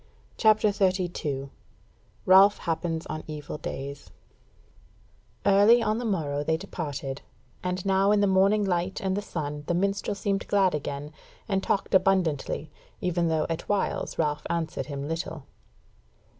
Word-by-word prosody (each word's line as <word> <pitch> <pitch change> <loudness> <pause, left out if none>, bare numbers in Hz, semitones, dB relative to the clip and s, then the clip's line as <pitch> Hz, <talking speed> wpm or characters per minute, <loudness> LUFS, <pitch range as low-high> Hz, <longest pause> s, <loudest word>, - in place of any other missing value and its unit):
CHAPTER 215 -1 +4
32 175 -8 -1 0.7
Ralph 195 +2 +7
Happens 165 -1 -2
on 155 0 -5
Evil 150 -1 -6
Days 140 +1 -6 1.4
Early 205 +4 +6
on 215 +2 0
the 245 - -4
morrow 150 -9 -1
they 160 +2 +1
departed, 145 -7 -5 0.4
and 180 +1 -3
now 195 +1 +3
in 210 - +4
the 205 - +4
morning 195 +2 +3
light 180 0 -1
and 190 -1 -1
the 205 - -1
sun 150 -6 -5
the 175 - +1
minstrel 195 +2 0
seemed 195 0 -2
glad 195 -3 +3
again, 145 0 -4 0.4
and 195 -2 0
talked 195 - -1
abundantly, 180 -6 +1 0.3
even 175 -1 0
though 160 -1 +1
at 165 -1 -4
whiles 205 -1 -1
Ralph 150 -2 -1
answered 160 -5 -2
him 140 -1 -5
little. 165 -2 -4
180 Hz, 140 wpm, -27 LUFS, 150-195 Hz, 1.4 s, Ralph